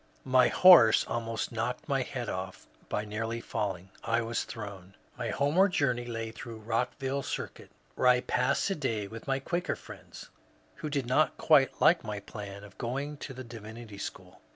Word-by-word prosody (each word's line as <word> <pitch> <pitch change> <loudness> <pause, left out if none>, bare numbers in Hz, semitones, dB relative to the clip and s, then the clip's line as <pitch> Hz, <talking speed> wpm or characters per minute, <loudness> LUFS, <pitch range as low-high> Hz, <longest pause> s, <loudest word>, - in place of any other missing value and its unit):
^* - - -35 0.2
My 130 -1 +5
horse 170 -12 +8
almost 115 -1 -3
knocked - - -3
my - - +1
head - - -4
off - - -5 0.2
by 105 - -1
nearly 115 +2 -3
falling. 95 -5 -4
I 115 +1 +1
was 115 +1 -2
thrown." 100 -4 -8 0.2
My 120 -2 -3
homeward 165 - +3
journey 125 -6 +1
lay 115 -1 -4
through 115 0 -8
Rockville 125 +5 -2
Circuit, - - -5 0.2
where 125 - +1
I 125 0 +6
passed 125 +2 +1
a - - 0
day 115 -8 -2
with 115 +5 -10
my 135 -1 +1
Quaker 175 +6 -2
friends, - - -12 0.5
who 155 - -4
did 140 -3 -1
not 130 +6 +2
quite 140 -4 +4
like 170 - +5
my 105 -2 -4
plan 100 -1 -8
of 100 -1 -14
going 140 +5 -3
to 135 -2 -7
the 130 - -7
Divinity 110 -2 -10
School. - - -8
120 Hz, 175 wpm, -30 LUFS, 110-135 Hz, 0.5 s, horse